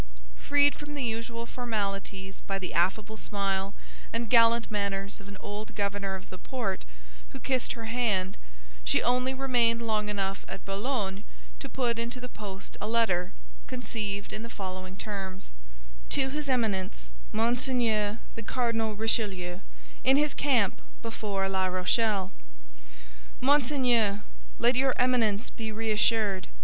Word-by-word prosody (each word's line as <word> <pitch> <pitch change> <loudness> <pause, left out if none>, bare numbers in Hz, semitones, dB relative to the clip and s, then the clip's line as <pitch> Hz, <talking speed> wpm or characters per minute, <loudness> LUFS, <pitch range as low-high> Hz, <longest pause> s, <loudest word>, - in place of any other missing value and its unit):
Freed 285 0 +5
from 295 0 -7
the 280 - -1
usual 230 0 -2
formalities 195 -5 -3
by 195 - 0
the 185 -1 -4
affable 205 +5 +1
smile 195 -1 -1 0.4
and 230 -1 -2
gallant 230 -1 +6
manners 200 -1 -1
of 195 - -12
an 200 0 -8
old 210 +1 -6
governor 200 -1 -1
of 190 - -10
the 185 - -8
port, 220 -8 -3 0.4
who - - -8
kissed 260 -2 0
her 230 -2 -6
hand, 220 -5 +1 0.5
she - - +3
only 250 +1 +3
remained 240 -3 +3
long 215 -2 +1
enough 195 -1 -1
at - - -7
Boulogne 200 -1 -1 0.4
to - - -6
put 235 -3 0
into 235 +2 -2
the 250 - -5
post 200 -5 -8
a 210 - -1
letter, 220 -6 +2 0.4
conceived 210 -5 -3
in 215 - -3
the 230 - -6
following 185 -3 -6
terms: 195 -2 -5 0.6
"To 265 - +2
his 295 +1 -3
Eminence 190 - 0 0.2
Monseigneur 230 -2 +2 0.2
the 230 - -6
Cardinal 225 -2 0
Richelieu, 200 -5 0 0.4
in 265 +2 +6
his 295 -1 +3
camp 245 -9 +2 0.2
before 205 -4 -1
La 190 -1 +1
Rochelle. 190 +1 +2 1.1
"MONSEIGNEUR, 250 -7 +3 0.3
Let 240 +2 +4
your 260 0 +3
Eminence 240 -4 +2
be 220 -2 -4
reassured. 215 -2 +2
220 Hz, 135 wpm, -29 LUFS, 195-240 Hz, 1.1 s, gallant